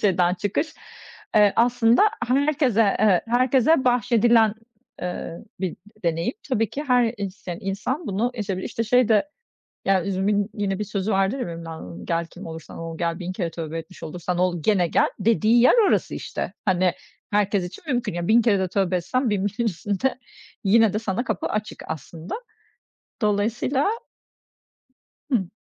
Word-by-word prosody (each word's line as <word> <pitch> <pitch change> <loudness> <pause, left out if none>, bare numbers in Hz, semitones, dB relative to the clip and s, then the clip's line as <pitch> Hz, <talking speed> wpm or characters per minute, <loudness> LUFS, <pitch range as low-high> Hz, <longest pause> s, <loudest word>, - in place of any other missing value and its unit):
Şeyden 180 -3 +3
çıkış, 210 - -2 0.6
eee, 210 -2 +6
aslında 235 0 +4 0.3
herkese, 260 -6 +3
evet, 200 -4 +4
herkese 255 +4 +3
bahşedilen, 235 -3 +4 0.5
eee, 175 -1 -4 0.2
bir 185 -3 -2 0.3
deneyim. 165 0 0 0.2
Tabii 225 -5 +1
ki, 290 - -4
her 245 -3 +3
isteyen 190 -4 -6
insan, 215 - -3
bunu 210 +5 0
yaşayabilir. 195 -5 -3
İşte, 230 - -3
şey 245 +1 +3
de, 220 +6 +3 0.6
ya 190 -2 +2
üzümün 200 +2 0
yine 195 -2 -1
bir 210 - -2
sözü 205 0 -2
vardır 195 +6 +1
ya, - - -1
Mevlana'nın, 160 - -8
gel 170 0 -1
kim - - -11
olursan 160 -1 -9
ol, 165 -1 -6
gel 170 -1 -1
1000 180 0 -4
kere 180 -3 -3
tövbe 165 -1 -5
etmiş 165 +3 -10
olursan 175 +2 -3
ol 180 -2 +1
gene 190 -1 +3
gel, - - +2
dediği 225 +2 +4
yer 250 - +6
orası - - +1
işte. - - -4
Hani, 185 -3 +2 0.4
herkes 200 -2 +1
için 180 - -9
mümkün. 245 -7 -2
Ya, 175 0 -3
1000 230 +2 +6
kere 215 -4 +3
de 190 -1 0
tövbe 185 0 +1
etsen 250 +8 0
1000 200 -1 0
1´in 215 +4 -2
üstünde, 210 +6 -1 0.5
yine 220 +1 +5
de, 215 - 0
sana 220 +2 -2
kapı - - -2
açık 215 0 -3
aslında. 160 +2 -6 0.9
Dolayısıyla 220 - +1 1.4
Hı. 210 -11 0
205 Hz, 155 wpm, -24 LUFS, 180-230 Hz, 1.4 s, eee